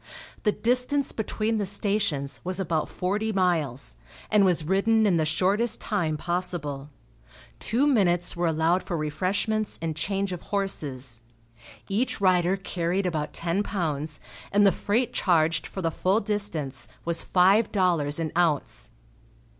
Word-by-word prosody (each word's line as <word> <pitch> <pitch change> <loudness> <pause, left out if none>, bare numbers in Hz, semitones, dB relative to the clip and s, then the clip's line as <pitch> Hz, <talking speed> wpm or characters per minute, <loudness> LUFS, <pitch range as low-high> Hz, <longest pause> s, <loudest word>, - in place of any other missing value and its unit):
The 210 - +2
distance 250 +5 +1
between 220 0 -1
the 205 - 0
stations 195 -9 0
was 185 +1 0
about 165 -4 -1
forty 205 +4 -1
miles, 165 - 0 0.3
and 210 -2 +5
was 180 -4 +3
ridden 215 +6 +2
in 185 -5 +3
the 155 -1 +1
shortest 195 +8 +1
time 170 -8 -1
possible. 165 -5 -3 0.7
Two 245 +6 +2
minutes 180 -10 +2
were 175 0 0
allowed 165 +3 +2
for 175 -1 -4
refreshments 190 +8 -1
and 165 -1 -3
change 195 +4 -1
of 180 - -5
horses. 140 - -1 0.7
Each 240 +5 -1
rider 185 -1 +3
carried 185 0 -2
about 155 -4 -2
ten 170 +3 0
pounds, 155 -7 -2 0.3
and 205 +1 +4
the 195 - +6
freight 230 +7 0
charged 165 -3 +2
for 190 - -6
the 165 - +1
full 190 +6 +1
distance 200 -11 -3 0.2
was 170 0 -1
five 195 +5 +3
dollars 170 -7 +2
an 160 -1 -2
ounce. 165 -5 0
180 Hz, 140 wpm, -26 LUFS, 160-205 Hz, 0.7 s, the